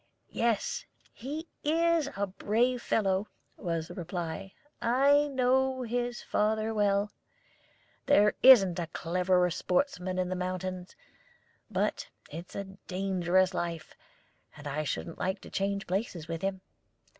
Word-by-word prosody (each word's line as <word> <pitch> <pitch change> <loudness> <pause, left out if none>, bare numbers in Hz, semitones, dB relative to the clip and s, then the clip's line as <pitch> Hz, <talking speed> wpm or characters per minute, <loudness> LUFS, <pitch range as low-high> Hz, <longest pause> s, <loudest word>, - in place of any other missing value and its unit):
"Yes, 230 -2 0 0.3
he 300 +7 -6 0.2
is 330 -1 +2
a 200 - +1
brave 230 +6 0
fellow," 195 -2 +1 0.3
was 165 -3 -3
the - - -9
reply. 175 +1 -5 0.3
"I 280 +5 +4
know 260 -1 +1
his 240 +1 -2
father 220 +1 0
well. 205 -1 +2 1.0
There 210 -7 +5
isn't 195 -9 +8
a 170 - -2
cleverer 180 +2 +1
sportsman 185 - -1
in 180 -1 0
the 185 - -1
mountains; 185 0 -4 0.7
but - - -1 0.2
it's 170 +2 -8
a 200 - -2 0.2
dangerous 185 0 +1
life, 170 -3 -4 0.6
and 145 - -11
I 150 +2 -2
shouldn't 165 +3 -4
like 190 +2 -1
to - - -12
change 200 +1 -1
places 180 -4 -3
with 165 0 -4
him. 195 -1 -2
195 Hz, 125 wpm, -30 LUFS, 180-240 Hz, 1.0 s, isn't